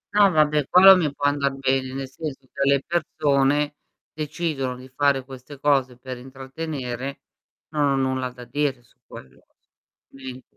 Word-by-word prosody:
No 205 -1 +6
vabbè 150 -2 +2
quello 190 +1 +9
mi 160 -5 0
può 145 0 -4
andar 140 -1 +1
bene, 130 -1 0
nel 135 -1 -4
senso 135 -1 -7
che 140 0 +1
le 140 -1 +3
persone 150 -3 +1 0.4
decidono 150 -4 -3
di 130 +1 -12
fare 135 0 +1
queste 135 +1 -11
cose 135 -4 +1
per 130 0 -7
intrattenere, 135 0 -6 0.5
non 150 -1 0
ho - - +1
nulla 130 -1 -1
da 125 -1 -12
dire 140 -3 -2
su 115 - -29
quello. 65 - -13 0.7
Mhmm. 130 -1 -9
135 Hz, 155 wpm, -23 LUFS, 130-150 Hz, 0.7 s, quello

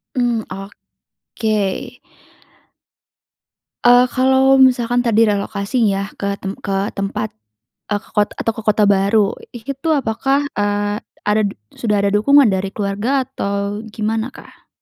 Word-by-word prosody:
Hmm, 240 -3 0 0.7
oke! 220 +3 -3 1.9
Eee, 245 +1 +7
kalau 265 +1 +4
misalkan 245 -2 +3
tadi 225 -1 +3
relokasi 205 +3 -1
ya, 200 -1 0
ke 200 0 -2
tem 195 +1 -5
ke 195 -1 -3 0.2
tempat 210 +2 -2 0.6
eee, 205 - +1
ke - - -21
kot 210 -1 +3
atau 225 - -2
ke 225 - -4
kota 215 0 +3
baru, 200 +1 +3 0.2
ih 240 -2 -9
itu 275 +4 -3
apakah, 270 +1 +1 0.2
eee, 205 0 0 0.3
ada 210 +1 +3
d 200 - -3 0.2
sudah 210 -3 0
ada 200 - +2
dukungan 270 +4 +5
dari 190 0 -1
keluarga, 210 +7 -1
atau 200 +1 -3
gimana 220 +3 -2
kah? - - -16
215 Hz, 135 wpm, -18 LUFS, 200-245 Hz, 1.9 s, Eee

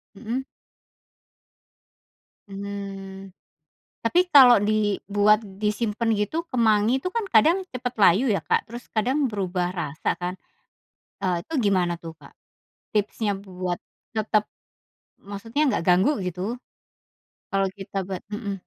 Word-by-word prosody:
Mhm. 235 +5 -4 2.0
Hmm. 195 -1 -7 0.7
Tapi 355 +9 +3
kalau 250 - +8
dibuat 210 0 +2 0.2
disimpen 220 +1 0
gitu 265 - -1
kemangi 220 -2 +3
itu 365 - -2
kan 455 -3 0
kadang 315 - +6 0.2
cepat 250 0 -3
layu 205 +6 +5
ya 200 - +3
Kak, - - 0
terus 240 +1 -8
kadang 250 +7 +1
berubah 185 -3 -1
rasa 155 -4 -2
kan, 180 +1 -2 0.9
eee, 180 -2 +1
itu - - -12
gimana 185 -3 +2
tuh, 165 -1 -7
Kak? - - -15 0.6
Tipsnya 210 0 0
buat 180 -1 -4 0.4
tetap, 215 -1 +2 0.9
maksudnya 225 +8 -3
nggak 255 - 0
ganggu 185 +10 +5 0.2
gitu 180 0 -4 1.1
kalau 195 -2 +1
kita 195 0 -10
ba 190 -2 -4
mhm. 205 -1 -4
205 Hz, 115 wpm, -24 LUFS, 195-230 Hz, 2.0 s, kalau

